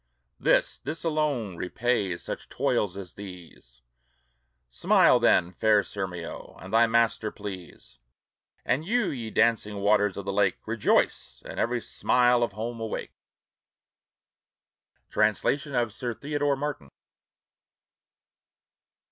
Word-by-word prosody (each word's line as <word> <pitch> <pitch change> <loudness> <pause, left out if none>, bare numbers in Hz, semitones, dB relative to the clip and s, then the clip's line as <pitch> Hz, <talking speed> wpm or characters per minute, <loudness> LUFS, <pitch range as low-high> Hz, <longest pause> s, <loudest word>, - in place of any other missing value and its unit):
This, - - +2
this 150 +6 -5
alone, 145 - -1
repays 95 -1 -1
such - - -6
toils 100 -2 0
as 95 -5 -8
these! 90 -11 -12 0.8
Smile, - - +4
then, 85 - +3
fair 105 +2 +3
Sirmio, 90 -4 -6
and 95 +3 -10
thy 115 +1 +5
master 115 -1 +1
please, 95 - -9 0.7
And 125 +7 +1
you, 230 +4 +1
ye 115 -5 -5
dancing 110 -2 +1
waters 100 0 +2
of 100 - -5
the 100 - -2
lake, 100 -2 +2
Rejoice; - - 0
and - - -7
every 120 +1 0
smile 125 +1 +2
of 120 -4 0
home 115 +3 -5
awake! 110 -1 -5 2.0
Translation 130 +7 +1
of 120 -3 0
Sir 120 0 -4
Theodore 145 -1 -1
Martin. 140 - -5
110 Hz, 115 wpm, -27 LUFS, 95-125 Hz, 2.0 s, thy